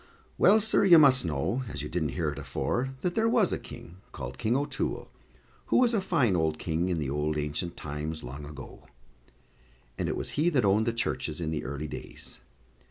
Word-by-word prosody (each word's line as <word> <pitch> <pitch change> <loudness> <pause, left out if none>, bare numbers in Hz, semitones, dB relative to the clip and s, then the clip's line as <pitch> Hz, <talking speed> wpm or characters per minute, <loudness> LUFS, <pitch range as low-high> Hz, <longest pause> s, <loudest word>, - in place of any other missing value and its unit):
Well, 215 +2 +6
sir, 215 -1 +3
you 180 -4 +8
must 135 - +6
know, 80 - -1
as 70 0 -4
you - - -4
didn't 80 -4 -2
hear - - 0
it - - -7
afore, 125 - -2
that 180 - -1
there 225 +2 +2
was 225 -6 +3
a - - -2
King, 85 +2 -11
called 60 -1 -7
King 115 +2 +1
O'Toole, 145 +1 -3 0.6
who - - +3
was 245 -2 +4
a 215 - +2
fine 140 - +2
old 80 -2 +1
King 85 +3 -1
in 90 - 0
the 75 -4 -2
old 75 +1 -1
ancient 75 +3 -3
times, 75 +2 -5
long 70 +4 -7
ago; 70 -2 -11 1.1
and - - -1
it - - -2
was - - -4
he 160 +4 +2
that 130 -9 +2
owned 105 +3 +3
the - - +3
churches 100 -8 -2
in 80 -2 -2
the 80 - -3
early 70 +3 -4
days. - - -10
85 Hz, 205 wpm, -28 LUFS, -, 1.1 s, you